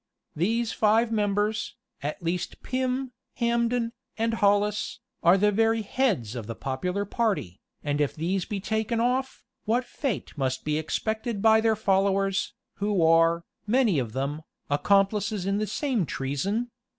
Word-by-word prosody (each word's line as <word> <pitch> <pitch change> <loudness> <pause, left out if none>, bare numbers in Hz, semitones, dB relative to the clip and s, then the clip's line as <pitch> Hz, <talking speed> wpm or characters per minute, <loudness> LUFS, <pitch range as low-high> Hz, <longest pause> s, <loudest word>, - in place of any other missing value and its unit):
These 225 +8 +1
five 225 +2 +3
members, 210 0 0 0.3
at 150 +4 -4
least 170 +1 -3
Pym, 260 0 -1 0.2
Hambden 235 0 +1 0.3
and 225 0 0
Hollis, 210 +1 +1 0.2
are 175 +3 +6
the 210 +2 +3
very 225 +1 +2
heads 200 - 0
of 115 -4 -5
the 115 - -5
popular 180 - -2
party; 200 - -1 0.2
and 145 0 0
if 145 - 0
these 180 +4 -1
be 205 +2 -4
taken 220 +3 -1
off, 255 +3 0 0.2
what 240 +3 +1
fate 255 -3 -4
must 130 -3 -2
be 150 0 +1
expected 220 +7 -2
by 220 +1 +5
their 220 -1 +3
followers, 195 -1 +1 0.2
who 200 -3 +1
are, 165 +1 +4 0.2
many 225 - +3
of 115 -4 -3
them, 140 +4 -2 0.3
accomplices 200 +5 +2
in 195 +1 +1
the 215 - -1
same 230 - -1
treason? 195 - -2
205 Hz, 145 wpm, -27 LUFS, 170-225 Hz, 0.3 s, are